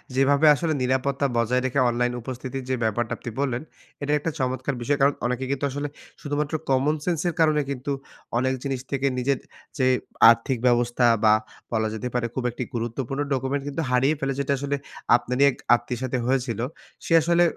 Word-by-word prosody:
যেভাবে 140 +3 +4
আসলে 160 +1 -1
নিরাপত্তা 130 +2 0
বজায় 125 +2 +2
রেখে 130 +2 0
অনলাইন 125 +1 0
উপস্থিতির 130 +2 -5
যে 130 - +2
ব্যাপারটা 110 +1 0
আপনি - - -7
বললেন, 130 -3 0 0.4
এটা 145 - -1
একটা 165 +2 -2
চমৎকার 130 +1 -1
বিষয়। 145 +4 +1
কারণ, 140 +1 +5
অনেকে 125 +2 -1
কিন্তু 140 0 -1
আসলে 145 +2 -3 0.3
শুধুমাত্র 145 +1 -2 0.2
কমনসেন্স 150 +5 +1
এর 170 - 0
কারণে 155 -2 +4
কিন্তু 140 +1 -3 0.5
অনেক 130 +1 +1
জিনিস 135 -2 -2
থেকে 140 0 +1
নিজের 130 +1 +1 0.4
যে 130 -2 +3 0.4
আর্থিক 115 +3 +2
ব্যবস্থা 120 0 +2 0.2
বা 105 0 +7 0.4
বলা 110 0 +1
যেতে 115 +3 -4
পারে 125 -1 0
খুব 130 - -2
একটি 125 - -4
গুরুত্বপূর্ণ 120 +4 -3
ডকুমেন্ট 135 +2 -1
কিন্তু 145 +3 -2
হারিয়ে 135 +5 +3
ফেলে। 135 0 -1
যেটা 140 0 +1
আসলে 140 +1 -1 0.4
আপনারই 125 +3 +1
এক - - -10 0.2
আত্মীয়ের 120 0 -5
সাথে 130 0 -1
হয়েছিল। 125 -3 0 0.5
সে - - 0
আসলে 170 +2 +3
130 Hz, 175 wpm, -24 LUFS, 125-140 Hz, 0.5 s, বা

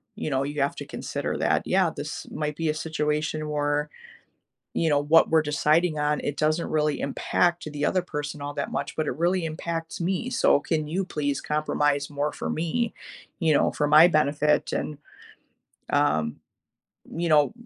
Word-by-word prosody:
you - - -4
know, 135 0 +1
you 145 +1 -3
have 140 - 0
to - - -6
consider - - -4
that, - - +1
yeah, - - +3
this - - -5
might 150 -1 -3
be 165 -1 0
a - - +2
situation 155 0 -2
where, 145 0 0 0.9
you 165 - +1
know, 145 -1 +3
what 155 +3 +4
we're 160 -1 +4
deciding 155 +2 +2
on, 150 0 +1
it 145 - -3
doesn't 155 +2 +1
really 150 -1 +1
impact 175 +5 0
the 145 0 -2
other 185 - +1
person 150 -4 -5
all 145 0 -5
that - - -3
much, - - -3
but 155 - -1
it - - -3
really 175 +2 +1
impacts 165 +1 -4
me, 190 +8 -1
so 145 - +3
can 155 -1 -1
you 185 +5 -1
please 145 -6 -2
compromise 145 -1 0
more 145 +1 -1
for - - -5
me, 170 +9 -1 0.5
you 160 -2 +3
know, - - +3
for 150 - 0
my 155 +3 +8
benefit, 150 -2 +2
and, 150 - -3 0.9
um, 75 0 +1 0.8
you 170 +1 -1
know, 150 +1 +4
150 Hz, 175 wpm, -26 LUFS, 145-165 Hz, 0.9 s, my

